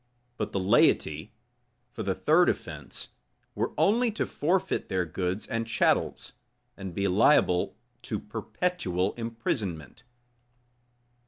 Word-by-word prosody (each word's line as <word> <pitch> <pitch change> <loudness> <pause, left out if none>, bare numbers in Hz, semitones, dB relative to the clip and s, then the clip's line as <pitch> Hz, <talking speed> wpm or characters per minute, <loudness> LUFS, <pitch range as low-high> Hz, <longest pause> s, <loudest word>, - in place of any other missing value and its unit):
But 105 - -3
the 100 - -1
laity, 95 -2 +3 0.6
for 120 - -6
the 95 -3 -1
third 175 +4 +4
offence, - - -5 0.4
were - - -1
only 235 +4 +3
to - - -1
forfeit 185 +5 0
their 95 -2 0
goods 90 +4 -2
and 115 0 -2
chattels, 115 -2 +1 0.4
and 95 -3 -7
be 100 0 +1
liable 95 -2 +3 0.2
to - - -3
perpetual 100 - -2
imprisonment. 110 -7 -4
105 Hz, 110 wpm, -28 LUFS, 90-150 Hz, 0.6 s, third